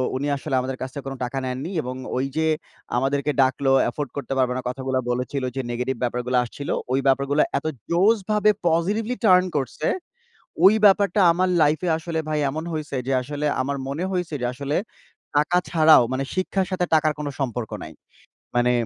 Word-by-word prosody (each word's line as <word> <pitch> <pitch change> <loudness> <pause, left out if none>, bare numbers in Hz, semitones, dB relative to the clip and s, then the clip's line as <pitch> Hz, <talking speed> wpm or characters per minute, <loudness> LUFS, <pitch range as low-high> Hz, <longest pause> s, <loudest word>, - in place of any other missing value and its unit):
উনি 140 +2 -2
আসলে 135 - -3
আমাদের 130 +1 -4
কাছ 130 - -3
থেকে 140 - -7
কোনো 135 0 -5
টাকা 125 +2 -4
নেননি 130 +8 -4
এবং 125 +1 -5 0.2
ওইযে 135 +5 -1 0.5
আমাদেরকে 140 +3 0
ডাকলো, 135 +1 +2 0.2
এফোর্ড 145 -1 -4
করতে 140 - -3
পারবে 125 -1 +2
না - - -2
কথাগুলা 130 0 -2
বলেছিল, 130 +2 -2
যে 135 - -1
নেগেটিভ 125 +2 -2
ব্যাপারগুলা 125 +1 0
আসছিল, 140 +4 -7 0.2
ওই 130 - +2
ব্যাপারগুলা 140 +2 +3
এত 140 - -5 0.2
জোশভাবে 210 +3 +3 0.2
পজিটিভলি 205 +9 +1
টার্ন 180 -2 +6
করছে, 140 +3 -2 0.8
ওই 195 - +9
ব্যাপারটা 200 0 +4
আমার 185 +2 +1
লাইফে 155 +4 +2
আসলে 160 0 -3
ভাই 155 -1 0
এমন 155 +3 -4
হইছে 155 -2 -4
যে, - - 0
আসলে 145 +3 -4 0.2
আমার 140 +2 -2
মনে 140 +6 -3
হইছে 180 -3 -2
যে - - 0
আসলে 140 +3 -3 0.6
টাকা 150 +4 +3
ছাড়াও 160 -5 +6
মানে 130 +1 -1
শিক্ষার 185 0 0
সাথে 180 -1 0
টাকার 155 -1 +3
কোনো 150 -1 -3
সম্পর্ক 120 -4 -3
নাই। - - -9 0.6
মানে 120 0 +3
145 Hz, 170 wpm, -23 LUFS, 130-170 Hz, 0.8 s, ওই